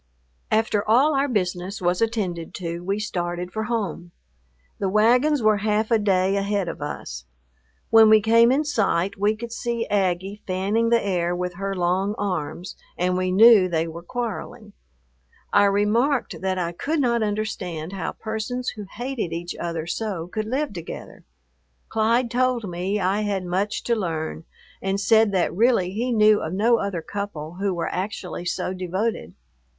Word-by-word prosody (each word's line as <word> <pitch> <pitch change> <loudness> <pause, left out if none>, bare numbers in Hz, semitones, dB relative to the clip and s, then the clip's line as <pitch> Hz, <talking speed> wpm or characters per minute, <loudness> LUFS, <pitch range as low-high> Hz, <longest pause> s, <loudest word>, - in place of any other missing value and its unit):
After 215 -2 +1
all 270 +7 +5
our 275 +1 +2
business 185 -4 -2
was 180 +1 0
attended 195 -8 -2
to, 170 -2 -4
we 195 +3 -2
started 180 -3 -3
for 220 0 -2
home. 205 -7 -3 0.7
The 195 - 0
wagons 245 +7 +3
were 215 -1 +4
half 215 +2 0
a 225 - +4
day 195 -1 +2
ahead 200 -1 0
of - - -6
us. 65 - -6 0.7
When 225 -1 +8
we 215 0 +7
came 230 +2 +5
in 280 +4 +2
sight, 200 - 0
we 205 +1 +1
could 235 +2 -7
see 235 0 -2
Aggie 195 0 0
fanning 200 +5 +1
the 235 0 +4
air 175 -2 0
with 180 0 -3
her 195 +2 -3
long 185 +3 0
arms, 180 -2 -3 0.2
and 180 +1 +1
we 185 0 0
knew 205 -1 +7
they 165 -1 0
were 165 +1 -7
quarreling. 225 +1 -5 0.8
I 205 - +6
remarked 220 +7 +1
that 190 0 -1
I 170 -2 -1
could 300 - -2
not 235 -4 +2
understand 195 -6 -3
how 190 -3 -3
persons 225 +3 -3
who 210 -2 -8
hated 245 -8 -4
each 170 +1 -4
other 165 -2 -3
so 180 -1 -3
could 215 +4 -4
live 275 +2 -1
together. 170 -3 -8 0.6
Clyde 230 +2 +1
told 250 -3 +1
me 185 +4 -2
I 195 +2 +1
had 200 -3 -2
much 190 +4 -1
to 235 - +1
learn, 165 -5 -3 0.4
and 195 +1 -1
said 220 +1 +4
that 185 -2 +1
really 215 -3 +2
he 235 +5 -2
knew 215 -2 +5
of 160 - -4
no 230 +5 +3
other 190 -5 -3
couple 175 -5 -6
who 200 -1 +1
were 170 -2 -2
actually 185 -2 -4
so 180 +1 -2
devoted. 185 - -3
200 Hz, 165 wpm, -23 LUFS, 180-225 Hz, 0.8 s, When